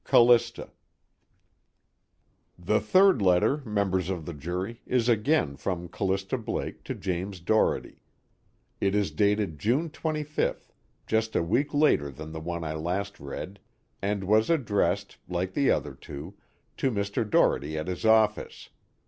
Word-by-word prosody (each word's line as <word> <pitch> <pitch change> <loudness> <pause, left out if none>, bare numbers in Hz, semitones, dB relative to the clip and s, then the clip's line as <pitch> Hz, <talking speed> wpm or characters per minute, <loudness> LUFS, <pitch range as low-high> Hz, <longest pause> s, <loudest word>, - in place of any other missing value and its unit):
"Callista." 120 0 +4 1.9
The 95 +5 +1
third 185 - +4
letter, 90 +8 +3
members 100 - -1
of 90 -5 -3
the 85 - -5
jury, 90 - -5
is 125 -2 +1
again 115 - +2
from 90 -2 -3
Callista 95 +5 -1
Blake 110 - -4
to - - -4
James 95 +1 -3
Doherty. 110 +6 0 0.8
It 100 0 +1
is 105 -1 +1
dated 100 -6 +1
June 135 - +1
25th, 155 -2 -2 0.3
just 110 0 0
a - - +2
week 135 - 0
later 145 - +3
than 75 +3 -9
the 80 0 -6
one 85 +1 -4
I 80 -1 -3
last 90 +6 -3
read, 80 +7 -7 0.4
and 100 0 -1
was 110 +3 +3
addressed, 125 -11 0
like 90 +1 -2
the 140 +5 +2
other 75 - 0
two, 70 +6 -9 0.4
to 135 - +1
Mr. 100 -2 -1
Doherty 75 -5 +2
at 75 - -3
his 90 -1 -4
office. 110 -1 +2
100 Hz, 140 wpm, -27 LUFS, 85-115 Hz, 1.9 s, Callista